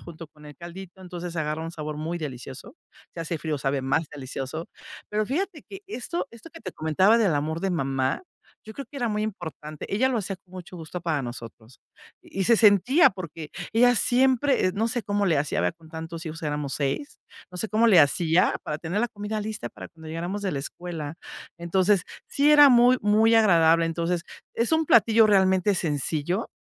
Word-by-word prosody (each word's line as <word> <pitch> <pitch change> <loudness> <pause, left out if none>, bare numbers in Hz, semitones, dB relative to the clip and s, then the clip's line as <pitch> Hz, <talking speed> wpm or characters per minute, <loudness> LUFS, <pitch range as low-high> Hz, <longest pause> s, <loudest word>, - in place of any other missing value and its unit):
junto 165 -1 -10
con 150 0 -17
el 145 -2 -12
caldito, 180 +2 -10
entonces, 175 -1 -7
agarra 155 0 -2
un 165 - -5
sabor 155 -2 -5
muy 160 +3 -4
delicioso, 135 - -8 0.4
si 170 - -6
hace 165 0 -3
frío, 155 -1 -3
sabe 135 0 -1
más 135 +5 +1
delicioso. 135 +3 -6 0.4
Pero 215 +1 0
fíjate 320 - -3
que 390 0 -11
esto 340 - -4
esto 235 +8 -14
que 330 - -13
te - - -7
comentaba 185 +8 +3
del 200 -9 +2
amor 155 +3 -2
de 195 - -1
mamá, 135 - -1 0.4
yo 220 - -9
creo 275 - -7
que 290 - -10
era 245 -3 -1
muy 210 -1 -1
importante 160 -7 -6
ella 255 +6 +2
lo 250 -3 0
hacía 195 -1 -3
con 185 -1 -29
mucho 185 0 -9
gusto 170 +2 -7
para 155 -4 -1
nosotros, 120 -1 -9 0.4
y 195 - -4
se 235 +2 +5
sentía, 230 - +5
porque, 165 -4 -8 0.2
ella 245 +2 +5
siempre, 260 +1 +3
eh, - - -3
no 220 +3 0
sé 235 +1 -2
cómo 205 0 0
le 165 -5 +2
hacía, 145 +1 -1
¿verdad?, - - 0
con 160 -1 -18
tantos 165 +1 -7
hijos, 160 +1 -7
éramos 150 -2 -3
6 145 - -3 0.3
no 180 - -10
sé 220 - -2
cómo 220 +2 +3
le 195 -7 +7
hacía 165 +4 +3
para 150 - -3
tener 175 +6 -2
la 240 - 0
comida 210 0 -4
lista 215 0 -5
para - - -10
cuando 160 -1 -13
llegáramos 175 +5 -4
de 195 - -1
la 140 - -2
escuela, 160 0 -6 0.4
entonces, 185 +3 +2 0.2
sí 285 +2 +2
era 290 -1 +9
muy 250 0 +5
muy 220 +2 +4
agradable, 165 -6 +5
entonces, 170 +1 -1 0.3
es 235 +6 0
un 320 0 +3
platillo 225 -2 +5
realmente 190 -1 +3
sencillo, 160 - -2
180 Hz, 200 wpm, -25 LUFS, 155-220 Hz, 0.4 s, era